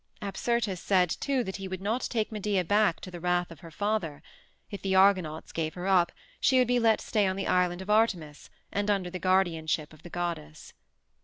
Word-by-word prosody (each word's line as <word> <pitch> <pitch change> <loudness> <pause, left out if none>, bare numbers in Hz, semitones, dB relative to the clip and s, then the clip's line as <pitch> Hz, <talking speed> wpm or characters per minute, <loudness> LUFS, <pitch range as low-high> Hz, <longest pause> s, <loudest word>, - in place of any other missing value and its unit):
Apsyrtus 210 -1 -1
said, 185 -4 +2
too, 275 -3 0
that 190 -3 -5
he 195 -1 -6
would 185 -1 -5
not 220 +6 -1
take 225 -3 -1
Medea 205 -3 0
back 205 0 +2
to 185 - -8
the 175 - -7
wrath 180 0 0
of 165 - -11
her 165 - -11
father; 165 -4 -2 0.5
if 200 - -6
the 190 -1 0
Argonauts 185 -5 +3
gave 160 -1 -3
her 180 0 -5
up 185 -3 +3 0.3
she 260 - +3
would 250 -2 +4
be 245 0 +2
let 225 -2 +3
stay 210 -3 +1
on 190 - -1
the 195 - -3
island 180 0 +1
of 195 - -13
Artemis 180 -9 +1 0.2
and 205 +1 -1
under 190 -3 0
the 185 - -5
guardianship 165 -5 +1
of 155 - -17
the 175 - -11
goddess. 165 -3 -5
190 Hz, 210 wpm, -28 LUFS, 170-205 Hz, 0.5 s, would